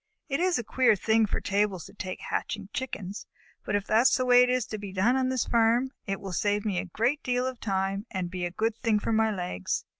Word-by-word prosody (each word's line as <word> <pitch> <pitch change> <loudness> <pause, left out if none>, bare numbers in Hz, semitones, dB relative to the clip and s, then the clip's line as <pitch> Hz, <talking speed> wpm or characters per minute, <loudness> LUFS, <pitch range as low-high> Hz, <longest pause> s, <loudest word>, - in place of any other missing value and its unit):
"It 275 +2 0
is 360 0 +2
a 240 - -3
queer 250 0 +3
thing 220 +2 +2
for - - -2
tables 200 -3 0
to 195 - -13
take 185 -3 -5
to - - -11
hatching 190 - -3
Chickens, 205 -6 -5 0.4
but 205 - -1
if 205 -1 0
that 220 +1 +4
is - - +3
the 255 - 0
way 245 0 +7
it 250 - +4
is 250 -2 +1
to 215 - -6
be 200 -1 -7
done 195 +7 +2
on 260 -1 +1
this 260 -2 0
farm, 235 +3 +2 0.2
it 195 -1 -2
will 195 -2 -6
save 205 +3 0
me 195 -4 0
a 190 - -3
great 235 - 0
deal 250 0 0
of 260 -2 -4
time 195 +1 -2
and 180 -2 -3
be 180 -1 -4
a 175 - 0
good 220 +5 -1
thing 225 -2 +1
for 215 +2 -1
my 220 0 +3
legs. 180 - -3
215 Hz, 260 wpm, -28 LUFS, 195-245 Hz, 0.4 s, way